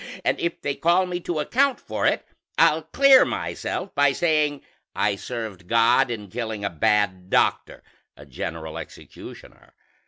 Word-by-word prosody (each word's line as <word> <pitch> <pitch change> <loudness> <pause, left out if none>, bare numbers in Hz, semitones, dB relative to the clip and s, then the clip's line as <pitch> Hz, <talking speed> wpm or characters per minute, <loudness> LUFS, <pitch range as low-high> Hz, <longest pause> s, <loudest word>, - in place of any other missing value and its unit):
And - - +1
if 170 0 -2
they 145 - -2
call 175 +5 +2
me 180 -1 -4
to 170 -2 -3
account 265 - +1
for - - -2
it, - - 0 0.3
I'll - - +4
clear 275 -2 +5
myself 190 - -4
by 145 -1 +3
saying 150 -3 0 0.3
I 105 -1 +1
served 105 -5 -7
God 115 +3 +3
in 105 -4 -5
killing 110 -1 -4
a 100 - -2
bad 95 +2 0
doctor - - 0 0.3
a 75 - -13
general 80 +4 -6
executioner. - - -13
120 Hz, 150 wpm, -23 LUFS, 100-170 Hz, 0.3 s, clear